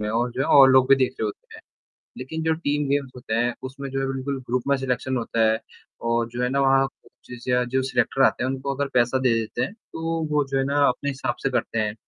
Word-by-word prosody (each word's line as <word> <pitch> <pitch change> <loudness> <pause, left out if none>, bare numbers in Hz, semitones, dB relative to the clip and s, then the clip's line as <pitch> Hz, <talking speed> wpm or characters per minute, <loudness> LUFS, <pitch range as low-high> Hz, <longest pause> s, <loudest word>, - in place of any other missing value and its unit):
में 105 - -2
और 120 +3 0
जो 130 - -4
है - - +1
और 135 -1 +9
लोग 130 0 +5
भी 135 - +8
देख 130 0 0
रहे - - 0
होते 105 - -9
हैं। - - -12 0.6
लेकिन 160 +6 -5
जो 160 - +2
टीम 145 -3 -1
गेम्स 140 -2 0
होते 120 -3 -4
हैं 120 +2 +1
उसमें 135 +1 -6
जो 135 0 -2
है 135 - -1
बिल्कुल 135 +1 -3
ग्रुप 125 +1 0
में 140 - +3
सिलेक्शन 130 0 -2
होता 115 -1 -2
है 110 - +1 0.5
और 115 0 +1
जो 120 +1 -4
है 125 - +1
ना 140 +2 0
वहाँ 135 0 +4
कोचेस 125 -2 -15
या 125 0 +3
जो 130 - +3
सिलेक्टर 135 0 +1
आते 125 - +2
हैं 130 - 0
उनको 135 +1 -3
अगर 140 +1 -2
पैसा 125 +2 +3
दे 130 -2 +2
देते 110 -1 -3
हैं, - - -2
तो 165 -6 -4
वो 150 -1 +2
जो 135 - +1
है 135 - +1
ना 145 +1 +1
अपने 140 - -1
हिसाब 135 - -3
से 135 - 0
करते 115 -2 -1
हैं। 105 -1 -1
130 Hz, 265 wpm, -24 LUFS, 125-140 Hz, 0.6 s, और